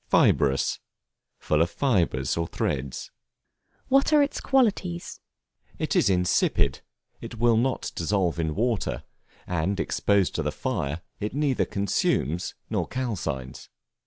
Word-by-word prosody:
Fibrous, 70 -1 +3 0.6
full 75 +1 +1
of 85 - +2
fibres 85 - +1
or 85 0 -1
threads. 65 -4 -3 0.8
What 275 +3 +3
are 300 -1 +6
its 285 - -3
qualities? 200 -10 0 0.6
It - - -1
is - - +4
insipid; 90 -7 +2 0.6
will 120 0 +4
not 125 +3 0
dissolve 90 -1 0
in 80 -2 -1
water; 115 -2 -1 0.4
and 90 +3 -1
exposed 100 -3 +1
to - - -1
the - - -1
fire, 70 +4 -3 0.2
it 105 +5 -3
neither 145 -3 +1
consumes 90 -4 0
nor - - -1
calcines. 80 - -4
95 Hz, 120 wpm, -26 LUFS, 80-130 Hz, 0.8 s, are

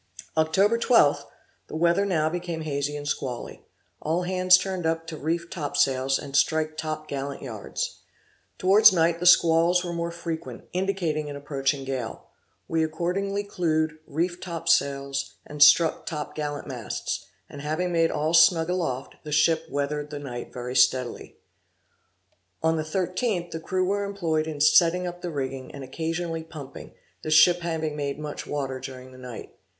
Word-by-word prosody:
Oct. 160 0 +2
12th, 200 - +4 0.4
the - - -8
weather 170 +5 +2
now 160 -5 +1
became 170 0 -3
hazy 145 -1 -2
and 145 0 -6
squally; 125 -4 -4 0.4
all 165 +4 0
hands 185 0 +5
turned 185 -1 -3
up 165 0 -1
to 165 -1 -6
reef 165 +3 -2
top 145 -5 -4
sails, 135 -1 +2
and 140 - -7
strike 155 +1 +2
top 155 -1 -4
gallant 140 0 -5
yards. 110 -6 -5 0.6
Towards 195 +3 +7
night 170 -1 +2
the 180 - +1
squalls 170 +1 +5
were 175 - -4
more 170 0 -2
frequent, 170 -1 -6
indicating 175 -5 -1
an 145 - -6
approaching 140 -1 -2
gale: 130 -4 -5 0.4
We 165 -1 +1
accordingly 180 +6 -1
clued, 155 -5 -1
reefed 175 +4 -2
top 170 -3 -6
sails, 140 0 +1
and 150 0 -8
struck 155 +2 +6
top 150 -2 -4
gallant 145 -1 -4
masts; 125 -5 -4 0.2
and 140 - -9
having 160 +5 -1
made 165 -1 +3
all 155 +2 -1
snug 165 0 +5
aloft, 150 -8 -3
the 150 - -7
ship 160 +2 +3
weathered 145 +1 -2
the 150 - -6
night 125 -4 -7
very 125 0 -6
steadily. 125 -1 +1 1.3
On 160 0 +3
the 160 - -1
13th 180 +2 -2
the 165 - -4
crew 185 +3 -1
were 200 +2 0
employed 165 -6 -1
in 150 -2 -5
setting 175 +3 +5
up 175 0 -6
the 175 - -4
rigging, 135 -3 -4
and 140 - -8
occasionally 165 +4 -3
pumping, 150 -4 -10 0.3
the - - -5
ship 155 +3 +6
having 160 -3 -2
made 140 -1 -3
much 150 -1 -6
water 135 -3 -3
during 130 -1 -9
the 130 - -14
night. 125 -2 -9
160 Hz, 165 wpm, -26 LUFS, 145-175 Hz, 1.3 s, Towards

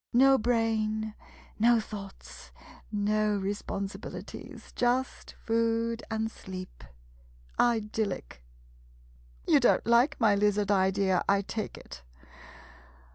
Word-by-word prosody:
No 270 +2 +6
brain 220 -2 0 0.2
— - - -24
no 235 +1 +5
thoughts 200 -3 -9 0.2
— - - -23
no 210 0 +1
responsibilities 200 0 -6
— - - -28
just 250 +2 -1
food 230 0 0
and 220 0 -2
sleep. 185 -3 -9 0.8
Idyllic! 215 - -1 1.0
You - - +6
don't 245 - +3
like 235 +4 +3
my 220 -4 +4
lizard 205 0 +2
idea, 190 -1 +2
I 200 0 +3
take 215 +1 -5
it? - - -11
215 Hz, 105 wpm, -29 LUFS, 200-230 Hz, 1.0 s, No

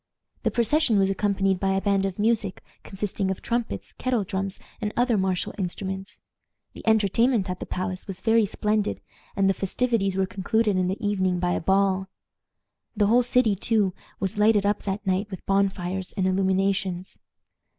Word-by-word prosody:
The - - +1
procession 235 0 +2
was 195 0 +3
accompanied 195 -1 +1
by 195 -1 +1
a - - +2
band 195 -1 +2
of 190 - -6
music, 215 -3 0 0.2
consisting 195 0 -3
of 190 - -4
trumpets, 235 -1 -2
kettle 250 -4 -1
drums, 190 0 -3 0.2
and 210 - -1
other 245 -1 +3
martial 190 -2 0
instruments. 190 +2 -4 0.5
The - - -10
entertainment 220 -1 +3
at 180 - -5
the - - -6
palace 185 0 -4
was 190 -2 -6
very 225 -2 +3
splendid, 210 0 0 0.4
and 195 -1 +3
the 195 - +4
festivities 195 -1 0
were 190 - +2
concluded 205 +3 0
in 185 -1 +1
the 190 +2 -1
evening 190 -3 +1
by 175 0 0
a - - 0
ball. 190 +1 +2 0.9
The 205 - +4
whole 235 +4 +5
city, 245 -3 +2
too, 205 -1 +1 0.3
was 195 +2 -2
lighted 210 -1 +4
up 205 +1 +1
that 200 +1 -3
night 190 +2 0
with 190 -3 -8
bonfires 190 -1 0
and 190 -2 -1
illuminations. 190 - 0
195 Hz, 170 wpm, -25 LUFS, 190-215 Hz, 0.9 s, whole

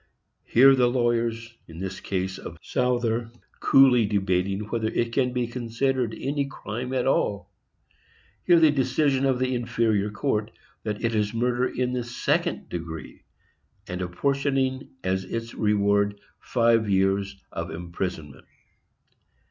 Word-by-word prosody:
Hear 135 +3 +6
the 125 -2 +3
lawyers, 120 -1 0
in 80 - -12
this 95 +1 -5
case 95 0 -3
of - - -9
Souther, 120 -2 0 0.3
coolly 125 -5 +5
debating 95 -1 0
whether 110 +1 -2
it 115 +1 -1
can 125 -1 +1
be 125 -1 -1
considered 120 0 -1
any 140 +1 -1
crime 125 -1 -6
at 130 -2 0
all. 100 -7 0 0.9
Hear 175 -2 +6
the 160 -2 +6
decision 135 0 +1
of 130 -2 +2
the 130 0 0
inferior 115 -4 0
court, 110 -1 -1 0.3
that 105 0 -4
it 115 - 0
is 105 0 0
murder 125 +2 +1
in 125 0 -2
the 125 -1 -1
second 120 +1 -1
degree, 80 -2 -7 0.7
and 90 -2 -4
apportioning 135 +7 -1
as 95 0 0
its 115 +4 -5
reward 100 -1 +1 0.2
five 115 -3 +2
years 95 0 +1
of - - -4
imprisonment. 85 -4 -6
115 Hz, 130 wpm, -25 LUFS, 100-125 Hz, 0.9 s, Hear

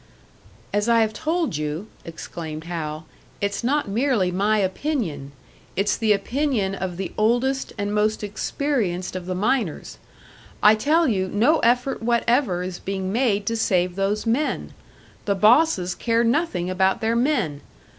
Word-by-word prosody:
"As 205 +3 +1
I 230 -1 +5
have 220 -1 +1
told 320 - -1
you," 150 +5 -3 0.2
exclaimed 160 -1 -7
Hal, 160 -2 -5 0.3
"it's 200 +1 -2
not 285 +3 +1
merely 215 -3 +1
my 205 +4 +1
opinion; 190 - -2 0.4
it's 200 +2 +1
the 220 -2 +1
opinion 215 -1 0
of 185 -3 -4
the 190 - -4
oldest 245 +5 +1
and 205 0 -2
most 215 +1 +1
experienced 205 -4 -2
of 180 -1 -5
the 185 - -2
miners. 215 - -1 0.6
I 210 - +8
tell 305 +9 +2
you 190 -6 0
no 240 - +3
effort 245 +2 +1
whatever 235 -4 +1
is 180 -1 -5
being 190 0 -3
made 220 -4 +1
to 230 - -1
save 180 -5 +1
those 200 +3 -1
men! 245 +7 -1 0.5
The 200 - +1
bosses 215 - +4
care 230 0 +1
nothing 230 - 0
about 190 +1 +1
their 225 +1 +1
men! 235 - 0
210 Hz, 145 wpm, -23 LUFS, 185-245 Hz, 0.6 s, I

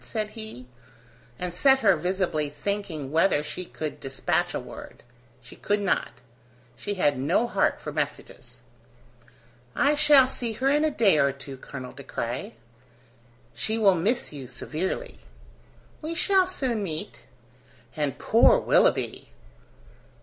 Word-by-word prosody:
said 215 -2 -3
he, 220 - -8 0.7
and 180 -1 -4
set 265 +8 +4
her 195 -4 +5
visibly 175 -3 -1
thinking 160 -3 -4
whether 160 -1 +3
she 180 - -5
could 155 -3 -6
dispatch 135 0 -1
a - - -1
word. - - -11 0.4
She - - -13
could 205 0 0
not; 200 -2 -1 0.5
she 205 - -4
had 145 -8 +1
no 165 - +2
heart 240 - +1
for - - -6
messages. - - -5 1.1
"I 285 +1 +3
shall 295 -3 +6
see 240 -3 -3
her 260 +5 -1
in 295 +1 +3
a 310 - +3
day 210 - +3
or 140 -1 +3
two, 135 0 -9
Colonel 130 -1 -9
De 140 - -10
Craye." 130 - -5 1.0
"She 220 - -1
will 205 -4 +5
miss 200 +4 0
you 135 -3 -7
severely." 190 - -4 0.8
"We 325 +2 -4
shall 380 +1 +3
soon 260 - -1
meet." 180 +1 -5 0.7
"And 150 -3 -2
poor 235 - +5
Willoughby!" - - +2
195 Hz, 135 wpm, -26 LUFS, 150-240 Hz, 1.1 s, shall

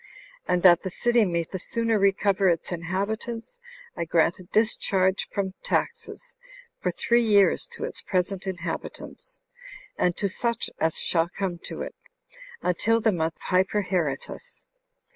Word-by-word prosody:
And 180 -1 +1
that 175 -2 +7
the 190 - -4
city 240 +4 +2
may 170 -2 0
the 190 +3 -6
sooner 230 +1 0
recover 195 0 +3
its 170 +1 -1
inhabitants, 210 - -3 0.4
I 170 - -2
grant 165 +1 +2
a 185 - -11
discharge 190 -2 +1
from 190 -2 -2
taxes 475 +1 -3 0.5
for - - 0
three 240 0 +2
years 205 -4 +4
to - - -7
its - - -4
present 190 +1 -1
inhabitants, 185 - -6 0.6
and 175 -1 +2
to 200 - +1
such 235 +4 -2
as 160 0 +1
shall 165 -1 +1
come 180 -2 -3
to - - -5
it, - - -7 0.7
until 225 +6 +2
the 220 -1 +3
month 160 -3 -1
Hyperheretus. 185 - -1
190 Hz, 140 wpm, -26 LUFS, 175-220 Hz, 0.7 s, that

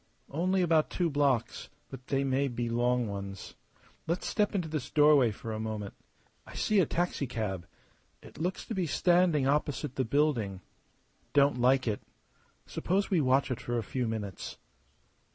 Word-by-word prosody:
"Only 185 +5 +1
about 160 -3 +3
two 175 -3 0
blocks; 140 -5 0 0.2
but 130 -1 -10
they 135 0 +1
may 135 +1 +1
be 120 -2 -3
long 120 0 +1
ones. 100 -1 -6 0.5
Let's 170 +3 -1
step 210 -1 0
into 180 -4 0
this 155 -4 -4
doorway 145 -5 +5
for 110 +1 -6
a 110 - -4
moment. 110 -2 -4 0.5
I - - -11
see 215 -2 +2
a 175 - +3
taxicab. 115 - -2 0.6
It - - -13
looks 180 +3 -2
to - - -5
be 185 -4 -1
standing 175 -3 +3
opposite 145 -1 0
the 130 - +2
building. 115 -8 0 0.7
Don't 140 -3 +4
like 130 +1 +3
it. 105 -2 -1 0.6
Suppose 195 +3 -1
we 175 -4 +3
watch 130 0 +2
it 125 - -3
for 120 0 -2
a 115 - -1
few 125 +3 -2
minutes?" 105 -4 -5
135 Hz, 160 wpm, -30 LUFS, 115-160 Hz, 0.7 s, doorway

